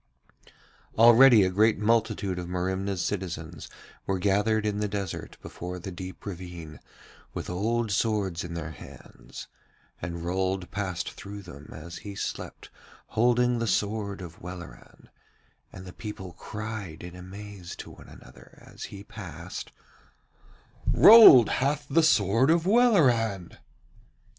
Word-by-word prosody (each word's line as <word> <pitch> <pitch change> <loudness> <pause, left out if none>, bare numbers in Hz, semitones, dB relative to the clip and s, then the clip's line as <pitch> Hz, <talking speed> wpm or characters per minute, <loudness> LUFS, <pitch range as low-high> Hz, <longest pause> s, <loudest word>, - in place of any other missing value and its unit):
Already 120 0 +7
a 95 - +1
great 110 +4 +3
multitude 105 -3 0
of 90 - -6
Merimna's 95 +1 -2
citizens 85 -4 -5 0.4
were 95 - 0
gathered 105 +3 +1
in 105 -1 -1
the 105 - 0
desert 100 -3 -5
before 90 +1 -7
the 95 +2 -7
deep 90 +1 -9
ravine 85 -5 -8 0.6
with - - -5
old 110 +4 -1
swords 100 -5 0
in 85 -1 -7
their 85 -1 -5
hands, 65 -4 -12 0.5
and 85 0 -5
Rold 95 +1 -2
passed 95 -4 -3
through 100 0 -9
them 75 -5 -12
as 85 0 -9
he 100 +3 -9
slept - - -6 0.4
holding 120 +1 +2
the 115 - -1
sword 100 -1 -1
of 85 -2 -10
Welleran, 85 -8 -11 0.6
and 95 - -11
the 90 - -10
people 95 -5 -8
cried 105 -7 -7
in 90 0 -9
amaze 95 0 -9
to - - -10
one - - -15
another - - -16
as - - -9
he 100 0 -10
passed: 90 -5 -9 1.2
'Rold 210 - +9
hath 145 +2 -1
the 165 - +3
sword 115 - +3
of 165 +1 +3
Welleran!' 130 - +3
100 Hz, 130 wpm, -27 LUFS, 90-110 Hz, 1.2 s, Rold